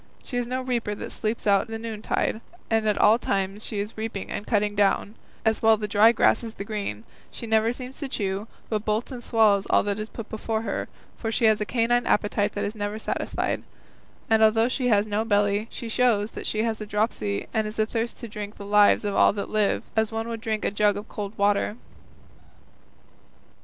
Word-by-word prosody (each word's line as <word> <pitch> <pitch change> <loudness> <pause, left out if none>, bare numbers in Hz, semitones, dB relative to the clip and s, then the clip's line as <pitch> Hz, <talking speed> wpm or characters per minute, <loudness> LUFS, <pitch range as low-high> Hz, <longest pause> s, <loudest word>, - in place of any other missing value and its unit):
She 245 - -4
is 245 -1 -1
no 255 +1 -2
reaper 235 -5 -1
that - - -6
sleeps 220 +1 -3
out 200 0 +3
the 225 0 -5
noontide; 220 0 -2 0.3
at 215 -2 +2
all 220 +3 +5
times 195 0 -1
she 215 - -3
is 205 +2 -3
reaping 220 -3 -4
and 205 - -5
cutting 210 -2 +1
down, 205 0 +1 0.3
as 220 0 +2
well 220 0 +5
the 210 0 -3
dry 210 +2 +6
grass 235 0 +3
as 225 -1 -7
the - - -5
green; 200 - -4 0.3
she - - -8
never 220 0 +2
seems 255 +1 -8
to 280 - -3
chew, 200 -2 -2 0.2
but 215 -2 -2
bolts 215 +4 -1
and 245 -2 -7
swallows 210 -4 +3
all - - +4
that 205 0 -2
is 215 +1 -4
put 225 -2 -8
before 220 0 -3
her, - - -3 0.3
for 225 - -3
she 230 - +1
has 215 -1 +4
a - - 0
canine 240 +1 +1
appetite 205 -1 +1
that 205 - -2
is 205 - -3
never 205 -1 -3
satisfied; 220 - -2 0.7
and 220 0 +3
though 225 +1 +5
she 255 0 -1
has 210 -3 +4
no 210 0 -1
belly, 205 0 +1
she 235 - -7
shows 225 -3 +1
she 215 0 0
has 225 -1 -2
a 215 - -5
dropsy 205 - -1
and 220 -1 +1
is 215 - -7
athirst 225 +2 -1
to 235 - -6
drink 210 -1 -7
the 200 - -8
lives 205 +1 +5
of 205 - -1
all - - +6
that 200 0 -5
live, 215 -2 +1
as 220 0 +1
one 225 0 -3
would 230 -1 -5
drink 220 -1 -2
a - - +1
jug 205 0 +2
of 210 +2 -7
cold 205 0 -6
water." 205 +1 +2
215 Hz, 210 wpm, -25 LUFS, 205-225 Hz, 0.7 s, dry